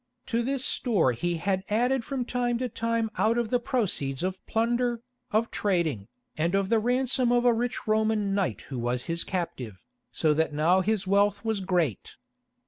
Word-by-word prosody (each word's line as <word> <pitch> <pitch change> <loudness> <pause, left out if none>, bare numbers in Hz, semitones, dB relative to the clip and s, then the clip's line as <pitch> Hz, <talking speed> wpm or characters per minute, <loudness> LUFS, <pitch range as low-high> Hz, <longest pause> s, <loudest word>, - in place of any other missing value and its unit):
To 230 0 0
this 265 +2 -1
store 200 - +2
he 175 +8 -2
had 190 +2 -1
added 245 +4 +1
from 260 0 -3
time 245 -1 0
to 250 +1 -2
time 230 -1 -1
out 225 +2 +3
of 235 -2 -1
the 245 - +3
proceeds 180 - -1
of 185 0 -3
plunder, 235 +1 0 0.3
of 220 +2 +1
trading, 170 - 0 0.3
and 170 +4 0
of 195 -1 +1
the 225 -1 +4
ransom 250 +1 +1
of 245 0 +3
a 240 - +6
rich 240 +2 -2
Roman 215 -2 +1
knight 190 - -1
who 130 -3 -6
was 120 +1 -1
his 170 0 -1
captive, 130 - -4 0.3
so 155 -1 +2
that 160 0 0
now 170 +5 +3
his 210 +1 0
wealth 200 +3 +2
was 220 -2 0
great. 175 - -1
210 Hz, 180 wpm, -27 LUFS, 170-235 Hz, 0.3 s, a